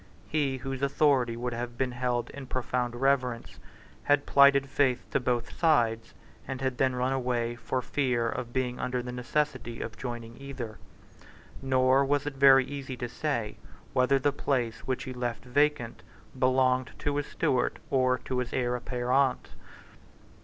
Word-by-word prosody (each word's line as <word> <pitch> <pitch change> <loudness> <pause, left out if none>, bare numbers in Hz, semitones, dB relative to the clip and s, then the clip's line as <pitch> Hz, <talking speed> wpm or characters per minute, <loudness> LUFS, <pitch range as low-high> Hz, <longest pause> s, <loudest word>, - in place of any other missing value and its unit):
He 145 -4 0
whose 135 +1 -5
authority 135 -4 +2
would 125 0 -3
have 120 0 -5
been 130 0 0
held 120 -1 -2
in 140 -2 -9
profound 125 -1 -2
reverence, 125 -2 0 0.5
had 145 0 +3
plighted 140 0 +5
faith 135 -2 +1
to - - +2
both 125 -2 -2
sides, 115 -9 +2 0.3
and 135 -1 -4
had 130 -2 -2
then 130 -1 +2
run 125 +1 0
away 120 -2 -1
for 125 +2 -3
fear 125 -4 0
of 120 +1 -4
being 125 -1 -2
under 125 -1 -2
the 125 - -5
necessity 125 -1 -2
of - - -6
joining 120 -1 -6
either; 125 -6 -7 0.8
nor 130 0 +3
was 140 +1 +1
it 145 - -3
very 135 -1 +6
easy 135 -2 -6
to 120 - -3
say 120 -5 -3 0.4
whether 130 +1 +3
the 145 +2 +1
place 120 -6 -1
which 130 0 -1
he 130 - -6
had 125 - -9
left 120 0 -3
vacant 125 -2 +1 0.4
belonged 130 0 +2
to 145 0 -2
his 145 - -2
steward 125 -2 0
or 130 -1 +3
to 130 +1 -3
his 125 -1 -3
heir 125 -1 0
apparent. 125 +2 0
130 Hz, 160 wpm, -28 LUFS, 120-135 Hz, 0.8 s, very